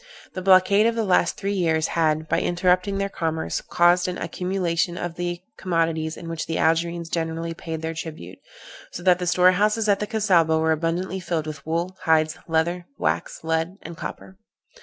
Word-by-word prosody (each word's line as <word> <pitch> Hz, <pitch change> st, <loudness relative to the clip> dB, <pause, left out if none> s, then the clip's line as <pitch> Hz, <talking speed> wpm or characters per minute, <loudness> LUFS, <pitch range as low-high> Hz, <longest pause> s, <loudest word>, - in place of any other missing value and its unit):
The 185 Hz, -, -4 dB
blockade 195 Hz, +3 st, +5 dB
of 230 Hz, -, 0 dB
the 230 Hz, -, 0 dB
last 180 Hz, -3 st, +2 dB
three 200 Hz, 0 st, -2 dB
years 160 Hz, -4 st, +1 dB
had, 155 Hz, -1 st, +1 dB
by -, -, +1 dB
interrupting 180 Hz, +2 st, +1 dB
their 195 Hz, 0 st, 0 dB
commerce, 160 Hz, -4 st, -2 dB
caused 175 Hz, +1 st, +3 dB
an 180 Hz, -, -3 dB
accumulation 175 Hz, 0 st, -1 dB
of 175 Hz, -2 st, -4 dB
the 175 Hz, 0 st, -4 dB, 0.2 s
commodities 165 Hz, -3 st, -1 dB
in 170 Hz, -, -9 dB
which 165 Hz, -1 st, -4 dB
the 165 Hz, -, -2 dB
Algerines 170 Hz, +1 st, +1 dB
generally 165 Hz, 0 st, -3 dB
paid 160 Hz, -1 st, -6 dB
their 160 Hz, 0 st, -2 dB
tribute, 155 Hz, -, -8 dB, 0.5 s
so 175 Hz, -, -7 dB
that 180 Hz, -1 st, +4 dB
the 180 Hz, -, -3 dB
storehouses 205 Hz, +5 st, +3 dB
at 200 Hz, -1 st, +3 dB
the 210 Hz, -, -2 dB
Cassaubah 180 Hz, -8 st, +3 dB
were 160 Hz, 0 st, +2 dB
abundantly 170 Hz, +4 st, -1 dB
filled 170 Hz, -3 st, -2 dB
with 150 Hz, -2 st, -7 dB
wool, 170 Hz, +3 st, -2 dB
hides, 155 Hz, -1 st, +3 dB
leather, 170 Hz, +2 st, 0 dB
wax, 85 Hz, -, -2 dB
lead 165 Hz, +3 st, -1 dB
and 170 Hz, -, -8 dB
copper. 190 Hz, +3 st, -8 dB
170 Hz, 180 wpm, -24 LUFS, 160-185 Hz, 0.5 s, blockade